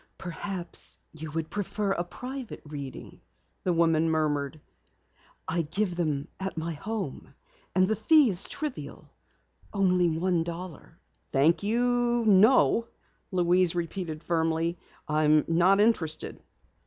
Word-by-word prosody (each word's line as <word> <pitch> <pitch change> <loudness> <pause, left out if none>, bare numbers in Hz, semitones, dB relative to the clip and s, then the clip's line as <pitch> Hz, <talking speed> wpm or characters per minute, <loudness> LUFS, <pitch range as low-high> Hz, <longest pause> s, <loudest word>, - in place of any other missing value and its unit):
"Perhaps, 175 0 -5 0.2
you 160 0 -7
would 160 -1 -3
prefer 205 0 -2
a 175 - 0
private 250 +6 -7
reading," 140 -3 -8 0.4
the 180 - +1
woman 165 -1 +3
murmured. 155 -2 0 0.9
"I 170 +1 0
give 180 +4 -2
them 150 -5 -1
at 190 -2 -4
my 165 +1 -2
home, 195 -1 -5 0.4
and 185 0 +4
the 220 - +1
fee 265 +4 +5
is 180 0 +4
trivial. 300 -4 -6 0.6
Only 180 -4 +2
a 175 -1 +1
dollar." 170 -1 -8 0.3
"Thank 155 +4 +3
you, 240 +2 +1
no," 220 +3 +5 0.4
Louise 180 -1 +3
repeated 170 -2 -4
firmly. 165 0 0 0.3
"I'm 155 -1 +3
not 175 +4 +4
interested." 195 -8 +1
175 Hz, 115 wpm, -28 LUFS, 160-200 Hz, 0.9 s, fee